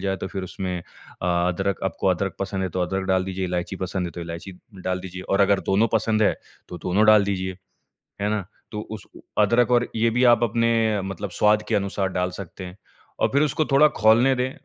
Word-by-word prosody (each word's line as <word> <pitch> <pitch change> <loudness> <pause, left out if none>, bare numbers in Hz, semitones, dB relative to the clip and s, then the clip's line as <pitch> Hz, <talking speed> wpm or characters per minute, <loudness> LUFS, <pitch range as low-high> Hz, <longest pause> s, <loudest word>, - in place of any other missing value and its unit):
जाए 95 -1 -1
तो - - -5
फ़िर 95 -2 -5
उसमें 90 0 -4
अ, - - -9 0.7
अदरक 95 +2 -2
आपको 95 +1 -2
अदरक 95 +1 0
पसंद 95 -1 -2
है 95 - -1
तो 90 +2 -3
अदरक 95 +1 -2
डाल 95 0 +2
दीजिए 95 0 -3
इलायची 90 +1 -3
पसंद 95 -1 -3
है - - -5
तो 85 - -7
इलायची 85 +3 -7 0.3
डाल 90 0 -1
दीजिए 90 0 -8
और 100 +1 +2
अगर 100 0 +4
दोनों 105 +4 +3
पसंद 110 0 +2
है - - +3 0.3
तो 90 - -7
दोनों 100 +4 +2
डाल 105 -2 +7
दीजिए, 95 -2 -3 0.6
है 105 - 0
ना? 105 -3 -1 0.3
तो 105 - -3
उस 110 -2 -7 0.3
अदरक 115 +3 +3
और 120 0 +3
ये 115 +1 +2
भी 125 +2 +1
आप 120 0 +5
अपने 115 -2 +2
मतलब 95 0 -5
स्वाद 105 +3 +3
के - - 0
अनुसार 100 -1 0
डाल 90 0 -1
सकते 95 0 -8
हैं। 90 +1 -9 0.4
और - - +3
फ़िर 140 +2 +3
उसको 155 +2 +1
थोड़ा 150 +3 +7
खौलने 115 +5 +5
दें 125 +1 -1
100 Hz, 215 wpm, -23 LUFS, 95-110 Hz, 0.7 s, डाल